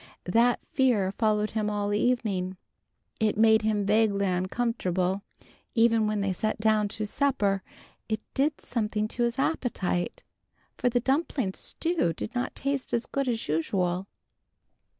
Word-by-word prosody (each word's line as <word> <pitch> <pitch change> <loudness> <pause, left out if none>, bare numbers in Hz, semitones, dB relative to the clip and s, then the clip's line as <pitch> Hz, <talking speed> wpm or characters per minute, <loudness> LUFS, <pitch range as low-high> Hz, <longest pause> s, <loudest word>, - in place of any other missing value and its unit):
That 235 +6 +3
fear 235 -8 +2
followed 215 0 +1
him 215 -1 -1
all 205 -1 -1
evening. 205 -5 0 0.6
It 215 -2 +1
made 220 0 +5
him 215 -2 0
vaguely 205 -1 +3
uncomfortable. 185 -1 0 0.5
Even 225 -2 +4
when 210 -1 0
they 195 -1 0
sat 215 +4 -1
down 215 -1 +3
to 215 +1 -4
supper 205 -5 +1 0.5
it 220 -1 0
did 290 +2 +1
something 215 -2 -1
to 240 - -3
his 235 +1 +1
appetite, 240 - -1 0.5
for 245 - +1
the 245 0 +2
dumpling 265 - 0
stew 325 - -1
did - - -5
not 245 0 -2
taste 275 -1 -2
as 235 +1 -1
good 275 -1 -2
as 230 -2 -1
usual. 175 +4 0
215 Hz, 140 wpm, -27 LUFS, 200-245 Hz, 0.6 s, made